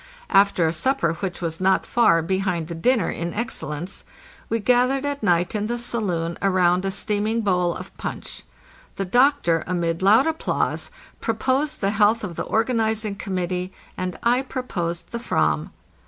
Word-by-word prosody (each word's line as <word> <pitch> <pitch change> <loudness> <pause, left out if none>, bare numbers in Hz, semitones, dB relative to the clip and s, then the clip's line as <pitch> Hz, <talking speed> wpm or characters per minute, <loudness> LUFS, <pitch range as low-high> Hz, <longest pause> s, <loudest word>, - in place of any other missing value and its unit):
After 195 -4 +4
a 160 - 0
supper 170 - +1
which 180 +1 -5
was 165 0 -3
not 190 0 +3
far 165 -9 +3
behind 180 -2 -1
the - - -4
dinner 210 +3 +2
in 170 +1 -4
excellence 190 - -4 0.5
we 225 - +1
gathered 250 +4 +2
at 285 0 -2
night 175 -4 +2
in 210 0 -1
the 240 +1 -2
saloon 180 -9 -2
around 185 -1 +3
a - - +1
steam 205 +2 -1
ing 230 +1 0
bowl 180 -4 +1
of - - -9
punch. - - -5 0.5
The 195 - -2
doctor, 245 - +3
amid 170 -2 -1
loud 210 +7 +6
applause, 320 0 -1 0.3
proposed 260 +6 0
the 195 0 +2
health 215 +2 +3
of 180 -5 -5
the - - -3
organizing 220 -2 0
committee, 185 -2 -3 0.2
and 185 -1 -4
I 245 +2 +3
proposed 180 -11 -4
the 235 - -3
/ram. 235 - 0
195 Hz, 160 wpm, -23 LUFS, 175-235 Hz, 0.5 s, loud